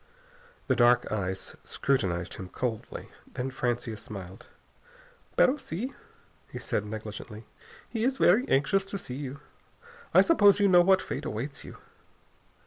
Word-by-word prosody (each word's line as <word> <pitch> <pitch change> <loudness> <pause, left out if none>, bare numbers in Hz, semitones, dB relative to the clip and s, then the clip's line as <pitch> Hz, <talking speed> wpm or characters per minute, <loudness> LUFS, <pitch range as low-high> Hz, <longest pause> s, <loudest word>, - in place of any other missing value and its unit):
The - - +2
dark 120 0 +4
eyes 95 -3 -3
scrutinized 95 -10 -1
him 95 -1 -8
coldly. 115 +2 -4 0.3
Then 130 +1 -2
Francia 120 -3 -2
smiled. 95 -3 -9 0.9
"Pero 265 +3 +5
si," 255 - -5 0.6
he - - -6
said 105 - -2
negligently, 110 0 -7 0.4
"he 225 -2 -3
is 265 +2 +1
very 225 +7 +4
anxious 145 +9 +3
to 200 0 -5
see 125 - -7
you. 140 +1 -6 0.7
I - - +7
suppose 205 - +5
you 205 - +5
know 180 -2 +7
what 190 +1 +4
fate - - -5
awaits 125 +7 -4
you?" - - -10
130 Hz, 135 wpm, -28 LUFS, -, 0.9 s, I